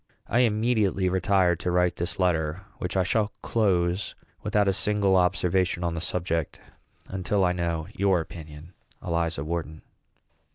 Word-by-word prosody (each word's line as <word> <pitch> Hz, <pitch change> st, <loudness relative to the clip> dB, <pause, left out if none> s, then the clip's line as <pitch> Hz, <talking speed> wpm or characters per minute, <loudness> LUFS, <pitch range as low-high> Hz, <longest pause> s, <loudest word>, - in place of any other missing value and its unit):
I 120 Hz, -, +1 dB
immediately 110 Hz, -5 st, +2 dB
retired 95 Hz, -2 st, +2 dB
to 90 Hz, -, -2 dB
write 90 Hz, 0 st, +2 dB
this 85 Hz, 0 st, -3 dB
letter, 85 Hz, -1 st, 0 dB, 0.2 s
which 90 Hz, +2 st, -2 dB
I 95 Hz, -, +4 dB
shall 105 Hz, +3 st, 0 dB
close 95 Hz, -4 st, +1 dB, 0.3 s
without 105 Hz, -1 st, +1 dB
a 95 Hz, -, +3 dB
single 100 Hz, -1 st, +2 dB
observation 90 Hz, -1 st, +1 dB
on 85 Hz, -1 st, 0 dB
the 80 Hz, -, -4 dB
subject 85 Hz, -3 st, -2 dB, 0.5 s
until 95 Hz, +1 st, 0 dB
I 90 Hz, -, +3 dB
know 85 Hz, -2 st, -2 dB
your 95 Hz, -2 st, +2 dB
opinion. 80 Hz, 0 st, -9 dB, 0.3 s
ELIZA 85 Hz, -3 st, -1 dB
WHARTON. 80 Hz, -1 st, -4 dB
90 Hz, 140 wpm, -26 LUFS, 85-100 Hz, 0.5 s, I